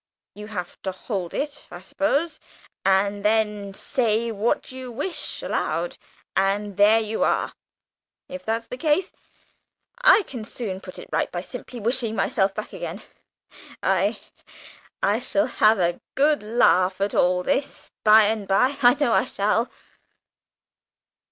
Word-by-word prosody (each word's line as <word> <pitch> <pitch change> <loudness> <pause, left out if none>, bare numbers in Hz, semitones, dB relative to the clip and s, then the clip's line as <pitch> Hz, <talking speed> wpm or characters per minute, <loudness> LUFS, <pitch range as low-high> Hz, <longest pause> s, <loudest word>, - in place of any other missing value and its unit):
You 210 +1 -9
have 180 -5 -6
to 190 - -3
hold 185 -2 -4
it, 290 0 -4
I - - -9
suppose, 300 +2 -1 0.4
and 200 +1 +2
then 210 -2 +1
say 230 -1 0
what 220 +5 -1
you 255 -1 -7
wish 295 +9 -4
aloud, - - -2 0.4
and 200 +1 0
there 210 +3 +5
you 220 0 -1
are. - - 0 0.7
If 275 -1 -8
that's 225 +1 -2
the 250 - -8
case, 325 +5 +1 0.9
I - - +6
can 245 -10 -7
soon 205 -4 -5
put 185 - -10
it - - -9
all - - +2
right - - -1
by 175 - -3
simply 245 +5 -8
wishing 230 0 0
myself 195 -2 +1
back 215 - -6
again. - - -6 0.8
I - - +1 0.8
I - - +2
shall 300 - +1
have 220 -3 +3
a 175 -2 0
good 295 +2 +3
laugh 195 -4 +3
at 200 0 0
all 180 0 +2
this 275 +9 -2
by 215 0 +8
and 210 -1 -1
by 255 +9 +2
I 245 +1 +6
know 280 -6 +1
I - - +3
shall!" 215 +1 0
220 Hz, 145 wpm, -24 LUFS, 200-255 Hz, 0.9 s, by